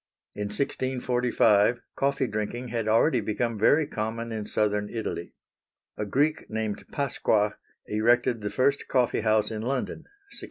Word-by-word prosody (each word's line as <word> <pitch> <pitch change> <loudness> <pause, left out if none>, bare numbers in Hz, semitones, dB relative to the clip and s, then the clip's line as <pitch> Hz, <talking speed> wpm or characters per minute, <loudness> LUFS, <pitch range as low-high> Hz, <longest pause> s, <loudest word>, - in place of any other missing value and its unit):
In 105 - -4
1645 125 -3 +1 0.2
coffee 140 -1 +1
drinking 120 +2 -3
had 115 -2 -2
already 115 +3 +3
become 110 +1 -2
very 145 +8 +4
common 115 -2 -4
in 110 -2 -4
southern 105 -1 0
Italy. 110 -6 -5 0.6
A 105 - -3
Greek 145 +7 +1
named 110 -1 -3
Pasqua 110 -6 +1 0.3
erected 115 +2 +2
the 105 - -2
first 135 +6 +1
coffee 125 -2 +1
house 110 0 +2
in 110 -1 -4
London 130 +3 -2 0.3
(1652). - - -4
115 Hz, 135 wpm, -27 LUFS, 105-125 Hz, 0.6 s, very